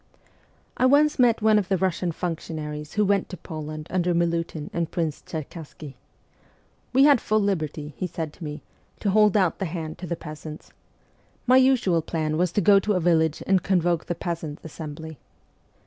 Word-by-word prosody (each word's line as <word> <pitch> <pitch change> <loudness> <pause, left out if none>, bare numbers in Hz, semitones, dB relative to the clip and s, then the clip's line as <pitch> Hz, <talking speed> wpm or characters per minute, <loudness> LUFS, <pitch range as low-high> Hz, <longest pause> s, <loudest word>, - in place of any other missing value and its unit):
I 255 - +4
once 295 +2 +4
met 235 -3 +4
one 215 -1 +5
of 195 - -3
the 190 - +2
Russian 180 -1 0
functionaries 155 -3 -5
who 210 0 +2
went 200 -1 +1
to 185 - -7
Poland 155 -2 -7
under 180 -1 +1
Milutin 165 -2 -1
and 170 -1 -1
Prince 160 -4 -2
Cherkassky. 155 -2 -8 0.5
' - - -36
We 265 +1 +5
had 285 -4 +6
full 215 0 +1
liberty,' 155 -7 -2
he 185 - -3
said 160 -2 -5
to 180 - -12
me, 150 -1 -6 0.2
' - - -37
to 200 - +1
hold 210 0 +4
out 185 -4 +1
the 195 - -1
hand 160 -2 -5
to 180 - -6
the 170 - -2
peasants. 155 -1 -9 0.7
My 255 +1 +6
usual 255 -10 +3
plan 155 -1 -2
was 175 +1 +1
to 205 - +2
go 200 +2 +6
to 210 +2 0
a 180 - +1
village 160 -2 +2
and 190 -1 +3
convoke 175 -3 +1
the 175 - -2
peasants' 165 -3 -5
assembly. 160 -1 -8
170 Hz, 185 wpm, -25 LUFS, 155-200 Hz, 0.7 s, had